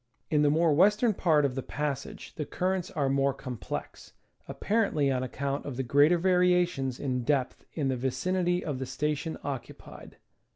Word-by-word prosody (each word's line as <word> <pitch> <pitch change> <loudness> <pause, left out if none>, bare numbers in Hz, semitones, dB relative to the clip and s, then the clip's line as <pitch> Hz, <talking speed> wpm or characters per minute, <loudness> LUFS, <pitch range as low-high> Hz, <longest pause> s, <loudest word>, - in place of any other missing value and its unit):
In 150 -1 +3
the 150 - +4
more 160 +1 +3
western 210 +8 +4
part 155 -6 +3
of 135 - 0
the 135 - -3
passage 140 0 -5
the 155 - -4
currents 185 +3 -2
are 140 -3 -1
more 135 0 +1
complex, 120 -9 -7 0.3
apparently 195 -11 +1
on 130 -1 0
account 140 +2 -3
of 135 -4 -6
the 135 - -1
greater 145 +7 +4
variations 180 -7 +2
in 125 -3 -2
depth 135 0 -1
in 145 -4 -1
the 130 -1 0
vicinity 175 +8 0
of 145 -5 -3
the 130 - -4
station 150 +4 -2
occupied. 135 -4 -8
145 Hz, 165 wpm, -28 LUFS, 135-175 Hz, 0.3 s, the